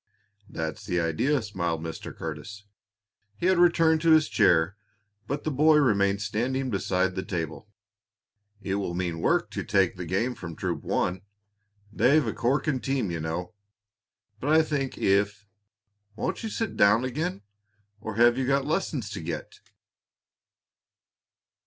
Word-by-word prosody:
"That's 80 +1 -5
the 90 -3 -1
idea!" 110 - +1
smiled 85 -6 -2
Mr. 80 -1 -6
Curtis. 80 +7 -7 0.7
He - - -3
had 185 -1 +4
returned 165 -2 +4
to 165 - +2
his 155 -1 +5
chair, 90 -3 +3 0.5
but 140 +4 -3
the 155 - -1
boy 155 +3 +4
remained 100 -7 +2
standing 125 +5 -1
beside 95 -1 0
the 95 - -3
table. 85 +3 -5 0.9
"It 95 - -2
will 85 -3 -3
mean 85 -2 -2
work - - +1
to - - -4
take 95 -3 +2
the 90 -1 -6
game 115 +9 0
from 85 -7 -8
Troop - - -3
One; 90 +1 -1 0.7
they've 140 +5 +4
a 110 - -2
corking 130 +4 0
team, 125 -5 -1
you 85 - -3
know. 80 +4 -4 0.9
But 135 - -3
I 160 0 +6
think 140 -4 -2
if 100 +1 +1 0.7
Won't 185 +11 -3
you 225 - -4
sit 225 0 -3
down 105 +5 +4
again, 145 - -3 0.6
or 110 0 -6
have 120 +2 +4
you 130 - -1
lessons 140 - -2
to 100 - -5
get?" 80 -1 -6
105 Hz, 145 wpm, -27 LUFS, 90-140 Hz, 0.9 s, I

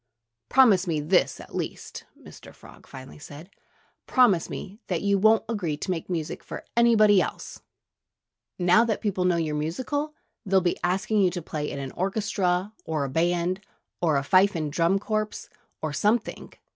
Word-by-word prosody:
"Promise 215 -9 +5
me 160 -3 0
this, 165 +5 +1
at - - -13
least - - -6
" - - -26
Mr. - - -13
Frog - - -16
finally 130 +2 -11
said 150 +6 -11 0.6
"promise 220 -10 +3
me 200 +3 -8
that 175 -1 -2
you 200 -1 +2
won't 220 +2 +4
agree 185 -10 -2
to 185 - -4
make 170 -1 -4
music 165 -4 -4
for - - -8
anybody 215 -4 +5
else! - - -6 1.0
Now 180 +5 +4
that 225 -3 -1
people 190 -4 -1
know 180 -1 +3
you're 160 -2 -1
musical, 260 - -3 0.3
they'll 195 -3 +3
be 175 -1 -1
asking 195 +4 +1
you 185 - +4
to 175 0 -5
play 150 -2 -4
in - - -6
an 135 -1 -5
orchestra, 190 0 -1
or 155 -3 -2
a 135 - -3
band, 175 +5 0 0.4
or 160 -4 +2
a 140 - -1
fife 190 +5 +4
and 155 -3 -3
drum 170 +4 +2
corps, 215 +1 -3 0.4
or 155 -2 -2
something. 210 +9 -1
185 Hz, 170 wpm, -25 LUFS, 160-210 Hz, 1.0 s, Promise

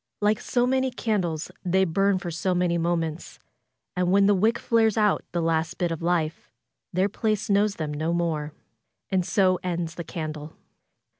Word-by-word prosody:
Like 210 0 +2
so 245 -1 +1
many 260 +1 +1
candles 190 -10 -2
they 190 +1 +2
burn 195 +3 +2
for 175 -1 -5
so 175 +3 -1
many 175 -1 +1
moments., 165 -1 -2 0.6
And 180 0 +1
when 200 +1 +5
the 205 - +5
wick 215 +4 +2
flares 225 -2 +2
out 210 -2 +2
the 170 -1 -1
last 160 -1 0
bit 175 -2 0
of 165 - -4
life, 165 -2 -1 0.4
their 185 +3 +2
place 215 0 -1
knows 200 +1 +3
them 155 -2 -4
no 155 +3 -1
more. 160 -3 -1 0.6
And 190 -1 +2
so 185 0 +2
ends 170 -2 -2
the 170 - -6
candle. 155 -3 -6
180 Hz, 170 wpm, -25 LUFS, 165-200 Hz, 0.6 s, when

